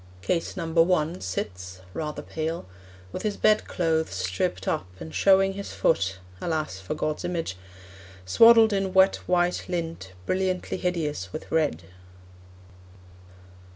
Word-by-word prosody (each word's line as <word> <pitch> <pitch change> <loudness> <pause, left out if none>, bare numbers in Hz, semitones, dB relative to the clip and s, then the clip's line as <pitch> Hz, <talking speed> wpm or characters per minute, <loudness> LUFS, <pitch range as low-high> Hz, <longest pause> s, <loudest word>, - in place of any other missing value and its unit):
Case 165 - -1
Number 165 0 +2
One 165 -1 +1
Sits 90 0 -5
(rather 150 -1 -4
pale) 160 - -4 0.5
with - - -5
his 210 -2 -2
bedclothes 165 -6 +2
Stripped 95 0 -2
up, 90 - -1
and 80 0 -8
showing 195 - +4
his 200 0 -7
foot 95 - +1 0.2
(Alas, 155 - -2
for 95 +10 -4
God's 155 0 -2
image!) 165 - -2 0.7
Swaddled 225 - +7
in 195 -1 -1
wet 190 +1 +6
white 180 0 +1
lint 165 - -4
Brilliantly 185 - -1
hideous 155 - -2
with - - -8
red. 150 - +1
165 Hz, 120 wpm, -26 LUFS, -, 0.7 s, Swaddled